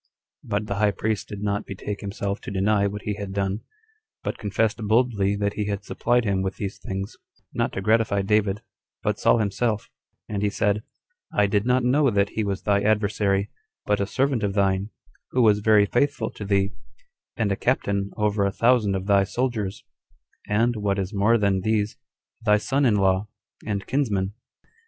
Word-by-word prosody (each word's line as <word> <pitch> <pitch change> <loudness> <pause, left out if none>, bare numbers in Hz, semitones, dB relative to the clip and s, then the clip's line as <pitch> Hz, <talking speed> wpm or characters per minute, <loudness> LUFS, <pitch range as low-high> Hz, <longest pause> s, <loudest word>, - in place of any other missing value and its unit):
But 105 +1 -2
the 100 -1 -3
high 105 0 +3
priest 105 +1 -2
did 105 -1 -7
not 105 0 -1
betake 100 +1 -5
himself 100 0 -3
to - - -7
deny 100 +1 +2
what 105 +1 -5
he 105 - -1
had 100 -2 -5
done, 100 +1 -1 0.6
but - - -3
confessed 105 +2 0
boldly 110 -3 +2
that 100 0 -1
he 105 - -2
had 100 -1 -3
supplied 120 +3 +1
him 100 -2 +1
with 95 0 -2
these 100 -1 -5
things, 95 +1 -5 0.4
not - - 0
to 95 - -3
gratify 105 -1 +2
David, 105 +1 +1 0.4
but - - 0
Saul - - +4
himself: 110 0 -1 0.4
and 100 -2 -3
he 105 - +2
said, 105 +1 0 0.5
"I 105 - +3
did 100 +3 +1
not 125 0 +3
know 135 +3 +3
that 100 -2 +2
he 110 - -2
was 100 -1 -3
thy 100 -1 +2
adversary, 100 -1 +1 0.3
but 105 0 +1
a 100 - 0
servant 135 0 +1
of 100 -1 -1
thine, 100 0 +1 0.4
who 125 - +4
was 105 -2 +5
very 105 -1 +5
faithful 135 +1 0
to 105 - -7
thee, 100 0 +1 0.6
and 110 -3 +1
a - - +2
captain 100 -4 0
over 105 -1 +1
a 100 - +1
thousand 115 -3 +3
of 95 0 -3
thy 100 -1 +4
soldiers, 110 -2 -2 0.6
and, 115 +3 +2
what 100 -1 0
is 95 +1 -3
more 105 +4 +4
than 100 -3 +1
these, 110 +1 0 0.5
thy 105 -2 +5
son 135 +6 +1
in 110 - +3
law, 95 0 +2 0.4
and 100 -2 -2
kinsman. 105 -8 0
105 Hz, 185 wpm, -24 LUFS, 100-110 Hz, 0.6 s, was